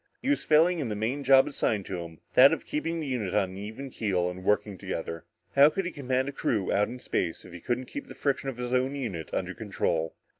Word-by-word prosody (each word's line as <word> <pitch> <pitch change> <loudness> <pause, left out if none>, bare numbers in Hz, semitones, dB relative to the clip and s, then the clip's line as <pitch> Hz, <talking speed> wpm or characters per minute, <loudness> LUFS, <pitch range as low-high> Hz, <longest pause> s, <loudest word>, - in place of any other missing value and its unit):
He 265 - -3
was 285 - +2
failing 165 +3 +4
in 135 -6 -2
the 105 - -2
main 120 +7 -2
job 135 0 +6
assigned 110 -8 -1
to 95 - -4
him, 85 -1 -9
that 135 +2 +8
of 160 - -4
keeping 165 +2 -2
the 155 - -3
unit 120 -9 -2
on 95 -3 +2
an 95 - -9
even 110 +7 -7
keel 90 -6 0
and 90 +1 -9
working 105 0 +1
together. 85 -3 -5 0.3
How 140 +2 +8
could 190 +4 -2
he 180 - -2
command 130 -2 -1
a - - -2
crew 110 -7 0
out 105 +1 +3
in 125 - -7
space 85 -8 -2
if 90 - -12
he 85 - -8
couldn't 120 +7 -2
keep 285 - -7
the - - -10
friction 140 -1 -1
of 130 - -6
his 125 0 -3
own 130 +2 +1
unit 105 - -4
under - - -2
control? 80 0 -2
125 Hz, 250 wpm, -28 LUFS, 95-140 Hz, 0.3 s, that